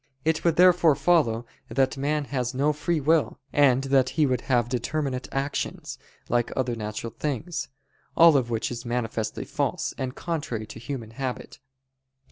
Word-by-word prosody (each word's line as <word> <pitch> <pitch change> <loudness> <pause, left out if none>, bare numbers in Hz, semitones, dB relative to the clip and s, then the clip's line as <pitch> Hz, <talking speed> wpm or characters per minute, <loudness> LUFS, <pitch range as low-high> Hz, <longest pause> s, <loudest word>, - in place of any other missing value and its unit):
It 160 0 +1
would 170 -2 +3
therefore 175 -4 +6
follow 140 -7 +2 0.2
that 135 0 +1
man 145 +2 -1
has 125 -2 -2
no 145 +3 +2
free 160 +2 -1
will, 155 +2 +2 0.2
and 135 -2 +4
that 135 -2 +3
he 155 - +5
would 130 -3 0
have 120 -4 +1
determinate 130 +2 -2
actions, 135 +2 -3 0.3
like 120 0 0
other 125 -2 0
natural 105 +1 -5
things. 145 0 -3 0.5
All 165 -2 +8
of 125 -4 +2
which 115 0 -1
is 120 - -5
manifestly 115 -2 -3
false, - - -2
and 130 0 -3
contrary 145 -10 -3
to 110 - -10
human 115 -2 -6
habit. 130 +1 -5
135 Hz, 155 wpm, -26 LUFS, 120-150 Hz, 0.5 s, All